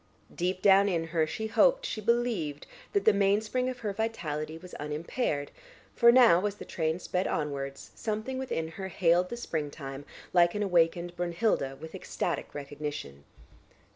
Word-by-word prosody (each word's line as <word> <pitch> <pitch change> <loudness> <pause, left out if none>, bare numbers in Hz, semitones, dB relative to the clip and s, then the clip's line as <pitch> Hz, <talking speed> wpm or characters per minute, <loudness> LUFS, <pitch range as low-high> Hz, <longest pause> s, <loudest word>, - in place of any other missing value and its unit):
Deep 185 +1 -2
down 200 0 +6
in 170 -3 0
her 160 -1 +1
she 220 +7 -4
hoped, - - +3
she 215 - -3
believed 215 -10 0 0.3
that 405 - +1
the 220 - +7
mainspring 210 +6 +1
of 250 -1 -6
her 210 -3 -2
vitality 160 -8 -3
was 180 +2 -12
unimpaired, 150 - -2 0.4
for 235 -1 +7
now, 235 -8 +6
as 205 - -4
the - - -9
train 160 -1 -1
sped 180 +1 -2
onwards, 140 -2 -3
something 220 +4 -3
within 165 -11 -2
her 190 +3 -6
hailed 180 0 +2
the 240 - -5
springtime, 145 - -5 0.3
like 175 0 +4
an 210 - 0
awakened 175 -1 +2
Brunnhilde, 170 -6 0
with 160 - -9
ecstatic - - -3
recognition. 145 - -6
175 Hz, 155 wpm, -29 LUFS, 155-215 Hz, 0.4 s, the